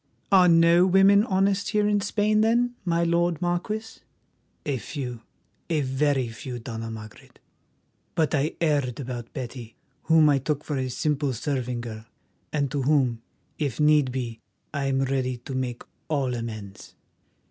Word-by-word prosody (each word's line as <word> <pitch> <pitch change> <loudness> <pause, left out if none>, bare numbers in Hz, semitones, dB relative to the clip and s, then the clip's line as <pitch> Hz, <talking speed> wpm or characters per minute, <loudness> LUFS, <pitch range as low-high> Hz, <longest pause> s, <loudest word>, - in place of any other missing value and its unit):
"Are 185 -2 +7
no 170 +1 +6
women 195 +2 +6
honest 195 -1 +1
here 210 -1 +2
in 205 -1 +2
Spain, 210 +1 +1
then, 240 +2 +2
my 170 -1 +1
lord 170 -1 +1
Marquis?" 195 +6 -3 0.7
"A 140 -3 0
few, 125 -4 -6 0.5
a 160 -3 +1
very 135 -1 +1
few, 120 +3 -7
Dona 115 -1 -6
Margaret. 110 -1 -11 0.8
But 160 -3 +1
I 150 +1 0
erred 145 -7 0
about 125 -3 -6
Betty, 120 -3 -7 0.3
whom 160 -1 +5
I 145 -2 +4
took 145 +2 -2
for 145 - -3
a 130 -1 -1
simple 145 +1 -1
serving 125 -1 -2
girl, 110 -2 -7 0.5
and 140 -3 -1
to 145 - -1
whom, 130 -4 +2 0.4
if 145 -5 -2
need 150 -3 +4
be, 120 -3 -4 0.3
I 140 -2 -1
am 135 0 +1
ready 130 -2 -1
to 130 +3 -8
make 125 -2 -3 0.3
all 140 -5 0
amends." 110 -4 -7
140 Hz, 150 wpm, -25 LUFS, 125-170 Hz, 0.8 s, Are